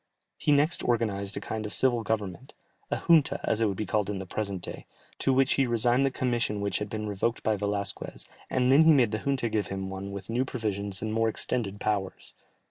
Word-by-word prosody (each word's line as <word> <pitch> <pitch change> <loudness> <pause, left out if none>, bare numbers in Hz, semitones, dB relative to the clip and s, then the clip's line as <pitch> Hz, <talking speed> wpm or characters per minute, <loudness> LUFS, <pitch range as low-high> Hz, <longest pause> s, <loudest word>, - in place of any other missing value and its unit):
He 150 - 0
next 145 +4 +3
organized 105 -4 0
a - - -1
kind 110 -1 -4
of 105 - -5
civil 125 -3 +2
government, 105 -6 -3 0.3
a - - 0
junta, 160 -4 +5
as 110 - +1
it 110 - +4
would 100 -2 -2
be 110 - -2
called 105 -2 0
in 105 - -2
the 95 - -5
present 100 -1 -4
day, - - -7 0.3
to 135 - +3
which 135 +1 +3
he 135 -2 +2
resigned 120 +3 +3
the - - +2
commission 120 -5 -1
which 100 0 -1
had 105 0 -4
been 105 0 -4
revoked 105 +3 -1
by 110 - +2
Velasquez, 100 -1 -3 0.2
and 125 0 +2
then 140 +4 +7
he 160 0 +7
made 125 -7 +4
the 110 - -1
junta 135 -2 0
give 110 -2 -1
him 95 0 -4
one 95 +1 -6
with 100 -1 -7
new 120 +3 0
provisions 100 -6 -3
and 110 0 -2
more 115 0 +2
extended 105 -3 -3
powers. 100 -3 -3
110 Hz, 220 wpm, -28 LUFS, 100-125 Hz, 0.3 s, then